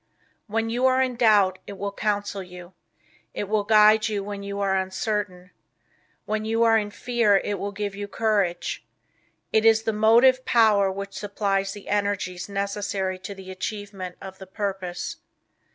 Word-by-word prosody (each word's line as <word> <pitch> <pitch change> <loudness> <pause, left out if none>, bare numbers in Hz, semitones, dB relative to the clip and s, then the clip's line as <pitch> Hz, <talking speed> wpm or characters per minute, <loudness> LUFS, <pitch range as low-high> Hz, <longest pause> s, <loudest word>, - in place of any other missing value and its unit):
When 225 +1 -1
you 250 +3 +2
are 260 0 +3
in 260 -1 +1
doubt 205 -6 +4
it 200 - -8
will 200 +1 -3
counsel 205 -1 -2
you. 180 0 -11 0.6
It - - -2
will 210 0 +1
guide 215 +1 +5
you 205 -2 -2
when 200 0 -6
you 200 0 -5
are 195 -1 +1
uncertain. 190 -1 -3 0.7
When 215 0 -2
you 225 +1 +1
are 225 -1 +5
in 210 -2 +1
fear 230 -2 +2
it 205 +1 -2
will 200 - -3
give 205 0 -4
you 205 0 -6
courage. 205 -5 -1 0.7
It 220 - +4
is 225 0 +5
the 225 - -1
motive 235 +5 +5
power 210 -6 +4
which 200 +1 -6
supplies 195 -1 -1
the 205 - -11
energies 200 -3 -2
necessary 200 -1 -2
to 195 +2 -7
the 190 -1 -10
achievement 195 -1 -6
of 190 -1 -10
the 190 - -10
purpose. 190 -3 -4
205 Hz, 165 wpm, -24 LUFS, 195-220 Hz, 0.7 s, guide